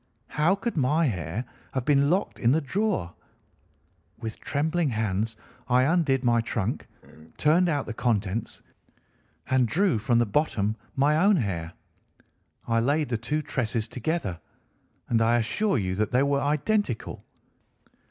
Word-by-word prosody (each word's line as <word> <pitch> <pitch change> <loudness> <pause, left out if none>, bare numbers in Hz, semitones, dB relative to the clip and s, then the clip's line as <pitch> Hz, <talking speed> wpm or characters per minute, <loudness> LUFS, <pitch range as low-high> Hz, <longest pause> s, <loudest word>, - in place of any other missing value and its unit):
How 160 +6 +2
could 230 +4 -4
my 150 +3 +2
hair 95 - -3 0.3
have 130 -2 -2
been 140 -1 +3
locked 185 +4 0
in 120 - +3
the 160 - +3
drawer? 180 - -1 1.0
With 115 -2 -6
trembling 160 +2 0
hands 110 -1 -1 0.3
I 125 0 +4
undid 140 -4 +2
my 120 -1 +3
trunk, 115 0 -3 0.5
turned 170 +4 +3
out 145 -4 0
the 115 - -5
contents, 110 -2 -2 0.8
and 130 -2 +3
drew 175 - +2
from 120 +2 +1
the 120 - +3
bottom 110 -3 0 0.2
my 145 +2 +3
own 200 +5 +5
hair. 85 - -2 0.9
I 115 0 +2
laid 145 +5 +1
the 115 - 0
two 150 +7 -2
tresses 115 -6 -1
together, 115 - -3 0.7
and 115 -1 +2
I 115 +1 +4
assure 195 - 0
you 95 -4 -1
that 105 +2 0
they 125 +2 +3
were 140 0 +1
identical. 150 - -1
130 Hz, 145 wpm, -26 LUFS, 110-155 Hz, 1.0 s, own